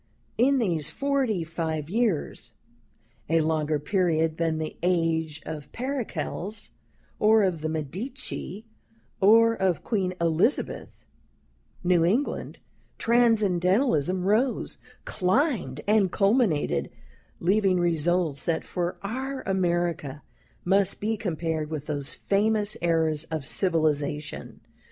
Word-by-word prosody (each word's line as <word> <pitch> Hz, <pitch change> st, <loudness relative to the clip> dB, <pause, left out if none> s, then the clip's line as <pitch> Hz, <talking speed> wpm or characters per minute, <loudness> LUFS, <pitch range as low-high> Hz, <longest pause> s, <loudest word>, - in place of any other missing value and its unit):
In 275 Hz, +3 st, +4 dB
these 170 Hz, -, 0 dB
forty 270 Hz, -, 0 dB
five 160 Hz, -2 st, -3 dB
years, 185 Hz, -, -1 dB, 0.8 s
a 165 Hz, 0 st, +3 dB
longer 155 Hz, -1 st, 0 dB
period 160 Hz, -1 st, 0 dB
than 165 Hz, -1 st, 0 dB
the 155 Hz, 0 st, -4 dB
age 165 Hz, -3 st, 0 dB
of 155 Hz, -3 st, -7 dB
Pericles, 230 Hz, -5 st, -4 dB, 0.5 s
or 215 Hz, 0 st, +5 dB
of 180 Hz, -5 st, 0 dB
the 155 Hz, -, -2 dB
Medici, 190 Hz, -, -5 dB, 0.5 s
or 230 Hz, +3 st, +6 dB
of 190 Hz, -7 st, 0 dB
Queen 190 Hz, -5 st, -1 dB
Elizabeth, 170 Hz, -, 0 dB, 0.8 s
New 175 Hz, -2 st, +3 dB
England 220 Hz, +12 st, 0 dB, 0.4 s
Transcendentalism 195 Hz, -, +2 dB
rose, 230 Hz, +6 st, +1 dB, 0.3 s
climbed, 185 Hz, -, 0 dB
and 205 Hz, -3 st, +3 dB
culminated, 200 Hz, -, +1 dB, 0.5 s
leaving 190 Hz, 0 st, +2 dB
results 170 Hz, -3 st, +1 dB
that, 165 Hz, -1 st, 0 dB
for 175 Hz, -1 st, -3 dB
our 260 Hz, +6 st, -4 dB
America, 175 Hz, -6 st, -1 dB, 0.4 s
must 195 Hz, +1 st, +2 dB
be 220 Hz, +2 st, 0 dB
compared 165 Hz, -6 st, -3 dB
with 155 Hz, -2 st, -5 dB
those 145 Hz, -2 st, -3 dB
famous 210 Hz, +1 st, +1 dB
eras 160 Hz, -2 st, +1 dB
of 160 Hz, -4 st, -4 dB
civilization. 150 Hz, -4 st, 0 dB
180 Hz, 105 wpm, -26 LUFS, 160-215 Hz, 0.8 s, or